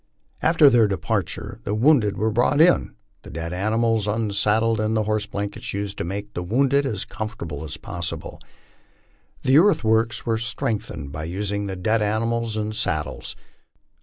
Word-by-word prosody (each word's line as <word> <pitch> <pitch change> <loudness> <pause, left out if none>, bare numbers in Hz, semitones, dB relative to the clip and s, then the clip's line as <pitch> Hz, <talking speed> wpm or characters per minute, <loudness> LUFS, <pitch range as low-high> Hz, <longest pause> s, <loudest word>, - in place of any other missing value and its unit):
After 160 -2 +5
their 120 -5 +5
departure 100 +2 -3
the 105 - -2
wounded 115 -3 +3
were 110 +1 +1
brought 125 +6 +2
in, 175 +3 +4 0.3
the - - -12
dead 85 +2 -5
animals 110 +3 +1
unsaddled, 110 +1 +1
and 110 +1 0
the 110 - +1
horse 105 0 -1
blankets 100 -1 -4
used 100 0 -4
to - - -1
make 100 +4 -5
the 90 - -3
wounded 135 +8 +2
as 105 -6 -2
comfortable 85 -9 -6
us 75 -1 -5
possible. 85 -4 -5 1.0
The 130 +3 +6
earthworks 115 - +2
were 115 -1 0
strengthened 110 - -3
by 75 +2 -5
using 100 +3 -2
the 95 - -4
dead 110 +5 +1
animals 110 +1 -1
and 110 0 -3
saddles. 75 -8 -2
110 Hz, 155 wpm, -23 LUFS, 100-115 Hz, 1.0 s, The